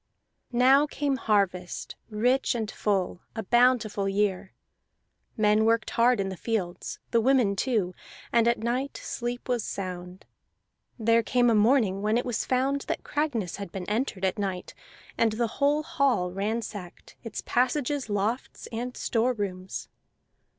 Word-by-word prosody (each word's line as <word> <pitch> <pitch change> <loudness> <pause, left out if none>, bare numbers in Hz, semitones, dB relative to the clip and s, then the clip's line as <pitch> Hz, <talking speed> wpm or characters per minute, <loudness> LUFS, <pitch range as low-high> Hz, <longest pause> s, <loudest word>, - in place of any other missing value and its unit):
Now 265 +4 +5
came 285 -2 -1
harvest 195 -6 0
rich 245 +5 +1
and 220 -3 -2
full, 190 -3 -1
a 220 - -3
bountiful 230 -3 +3
year; 195 -1 -1 0.8
men 215 0 +4
worked 230 +1 +2
hard 240 0 +3
in 195 -1 0
the 190 - -5
fields, 185 -4 -3
the 230 - +4
women 245 -5 +3
too, 200 -5 0 0.4
and 235 -1 +4
at 235 - +3
night 245 +5 -2
sleep 240 +1 -4
was 245 -4 0
sound. 180 -1 -6 0.7
There 230 0 +3
came 245 +1 +3
a - - +4
morning 215 -3 +3
when 215 +2 +2
it 245 - -1
was 245 -3 -1
found 270 +2 +1
that - - -2
Cragness 255 - -2
had 200 -4 -7
been 185 -2 -6
entered 210 -3 -1
at 190 +2 -1
night 190 -3 -3 0.5
and 225 -2 +3
the 235 +2 0 0.2
whole 295 +2 +3
hall 275 - +1
ransacked, 205 -1 -5
its 230 -3 -5
passages, 255 +1 0
lofts, 210 +5 -2
and 245 +2 -4
store 240 +1 +1
rooms. 190 -4 -5
225 Hz, 145 wpm, -27 LUFS, 200-250 Hz, 0.8 s, Now